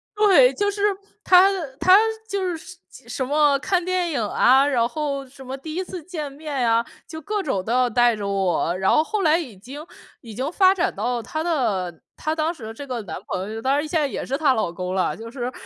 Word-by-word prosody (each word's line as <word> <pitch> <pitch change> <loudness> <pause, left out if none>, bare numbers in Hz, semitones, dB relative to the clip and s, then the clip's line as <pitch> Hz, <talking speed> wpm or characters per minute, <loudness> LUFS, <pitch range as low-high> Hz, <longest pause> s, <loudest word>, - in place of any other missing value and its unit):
对， 370 -12 +5
就 405 +7 0
是 400 0 -6 0.4
她 370 +1 +6 0.3
她 370 +1 +7 0.3
就 400 -1 -2
是 355 -2 -2
什 360 +2 -15
什 260 - -3
么 290 0 +3
看 360 +4 0
电 360 -1 -1
影 265 -6 -1
啊， 255 +5 +4
然 240 -5 +2
后 280 0 -3
什 265 +1 -14
么 260 +1 -6
第 310 +3 -8
1 370 - -1
次 360 -2 -8
见 305 -5 -6
面 280 -4 -3
啊， 230 +1 +2 0.2
就 320 -1 -8
各 420 +6 -2
种 195 - -1
都 225 - -4
要 250 0 +3
带 240 0 +3
着 205 -2 -5
我。 185 -3 0
然 190 0 +2
后 305 - +4
后 415 +6 -2
来 315 -1 +4
已 260 - -7
经 275 - -10 0.4
已 225 -3 -10
经 270 +4 -3
发 375 +1 +5
展 375 -1 -1
到 245 -1 -2
她 310 +7 -4
的 200 - -1
她 310 +1 -2
当 320 +1 0
时 225 -9 -9
这 280 +5 -8
个 250 -3 -4
男 170 -5 -6
朋 190 +3 -4
友， 225 - -5
当 265 +3 +1
然 295 +2 -1
现 320 +1 0
在 290 - +1
也 - - -5
是 270 - -2
她 290 -3 +3
老 220 -8 -1
公 180 +1 -5
了。 185 - 0
就 225 +2 -9
是， 250 -1 -4
275 Hz, 245 characters per minute, -22 LUFS, 230-330 Hz, 0.4 s, 她